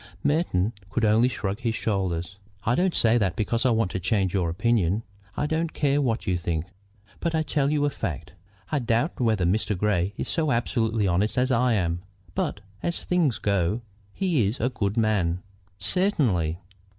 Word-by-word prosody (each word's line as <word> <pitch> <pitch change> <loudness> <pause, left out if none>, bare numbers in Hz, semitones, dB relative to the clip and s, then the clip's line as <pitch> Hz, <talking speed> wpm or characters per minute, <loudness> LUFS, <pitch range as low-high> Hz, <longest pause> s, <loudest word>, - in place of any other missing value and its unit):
Merton 120 - +1 0.2
could 115 +4 0
only 110 +3 +4
shrug 100 -4 -3
his 115 -3 -1
shoulders. 95 -4 -2 0.2
"I 120 - +2
don't 180 +6 +1
say 115 +1 +4
that 95 -5 0
because 115 +4 +1
I - - +4
want 115 -5 +1
you 95 - -1
to - - -14
change 95 -2 +1
your 90 -4 +1
opinion. 105 +2 +1 0.3
I - - +1
don't 160 +2 -1
care 145 0 +2
what 120 -3 0
you 90 -2 0
think. 85 -1 -2 0.5
But 170 -1 -1
I 160 - +2
tell 145 -2 +1
you 145 -1 +2
a 145 - +1
fact. 80 - -5 0.4
I 150 - +2
doubt 120 +5 0
whether 110 -6 +2
Grey 100 0 +1
is - - -3
so 160 -3 0
absolutely 115 -3 +1
honest 100 +6 +1
as 130 +1 +2
I 125 0 +3
am, 85 -4 0 0.3
but, 100 - -2 0.2
as 170 - -2
things 170 -9 +1
go, 100 +3 0 0.3
he 160 - +1
is 105 - -3
a 125 - +1
good 105 -3 -2
man." 95 -6 +1 0.3
"Certainly." 100 - +1
110 Hz, 180 wpm, -26 LUFS, 95-130 Hz, 0.5 s, only